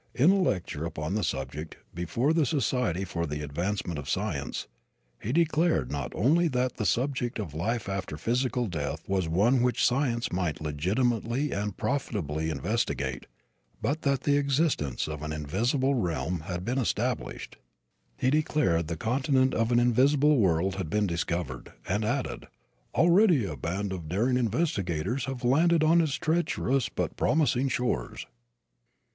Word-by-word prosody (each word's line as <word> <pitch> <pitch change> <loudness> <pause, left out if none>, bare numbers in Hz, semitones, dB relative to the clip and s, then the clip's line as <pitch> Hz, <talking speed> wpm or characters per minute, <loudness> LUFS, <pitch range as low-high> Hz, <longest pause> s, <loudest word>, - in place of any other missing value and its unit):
In 145 +8 +5
a 195 0 +3
lecture 90 - -1
upon 80 0 -3
the 105 0 0
subject, 70 +4 -4 0.2
before 100 - 0
the 160 -4 +2
Society 120 - 0
for 85 -2 -3
the 75 0 -4
Advancement 85 +2 -2
of 70 0 -7
Science, 75 - -2 0.5
he 110 - -3
declared 160 - +2
not 70 -1 -3
only 160 - +3
that 125 -3 -1
the 105 - 0
subject 125 0 0
of 100 -10 -5
life 110 +10 -2
after 95 -6 -4
physical 125 - 0
death 80 -4 -4
was 95 -4 0
one 110 +10 +3
which 125 -1 +2
science 120 -2 +1
might 90 -4 -1
legitimately 115 - 0
and 100 -1 -3
profitably 80 - -2
investigate 70 - -2 0.5
but 155 +3 -1
that 140 -2 +1
the 145 -1 +2
existence 140 - 0
of 75 -1 -5
an 75 0 -4
invisible 115 - 0
realm 90 - -1
had 90 -1 -4
been 125 +3 0
established. 125 0 -2 0.6
He 130 - +1
declared 150 - +1
the 85 0 -3
continent 130 - +1
of 115 +1 +1
an 120 - +5
invisible 140 +5 +4
world 95 -2 +2
had 95 -5 -3
been 105 +4 +1
discovered, 85 -2 -3
and 105 +4 0
added, 125 +5 -2 0.5
"already 170 - +5
a 80 - -4
band 95 +8 -3
of 85 -4 -6
daring 120 +8 +1
investigators 115 - -1
have 130 -1 -5
landed 160 +6 +4
on 165 +2 +5
its 150 -4 0
treacherous 155 -6 0
but - - -3
promising 135 -4 +2
shores." 120 - -2
115 Hz, 150 wpm, -28 LUFS, 85-135 Hz, 0.6 s, In